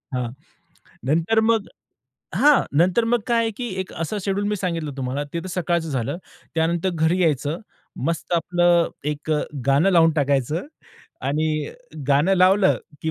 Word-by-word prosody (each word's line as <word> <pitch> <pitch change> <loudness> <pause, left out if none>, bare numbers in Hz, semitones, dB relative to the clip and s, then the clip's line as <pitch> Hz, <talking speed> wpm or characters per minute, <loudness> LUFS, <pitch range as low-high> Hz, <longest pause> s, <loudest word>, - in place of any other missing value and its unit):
हां. 125 -2 -2 0.8
नंतर 170 +10 +2
मग 220 -2 +2 0.7
हां 295 0 +5 0.2
नंतर 185 +7 +3
मग 240 +1 +2
काय 235 -1 +3
आहे 225 -1 0
की 245 -1 -3
एक 185 - -9
अस 165 +4 -4
शेड्यूल 200 +1 -1
मी 210 - 0
सांगितलं 170 -5 -2
तुम्हाला 135 +2 -2
ते 170 - -1
तर - - -6
सकाळचं 170 -2 -1
झालं. 135 +4 -2 0.4
त्यानंतर 165 +3 +1
घरी 170 +1 +1
यायचं. 150 0 0 0.5
मस्त 165 +1 -2
आपलं 175 0 +3 0.2
एक 150 +1 -5
अ, 150 - +2 0.3
गाणं 145 +8 +4
लावून 165 -2 +5
टाकायचं 145 +2 0 0.6
आणि 155 +3 0 0.6
गाणं 150 +7 +4
लावलं 190 +2 +4 0.2
की 160 - 0
170 Hz, 150 wpm, -22 LUFS, 150-190 Hz, 0.8 s, हां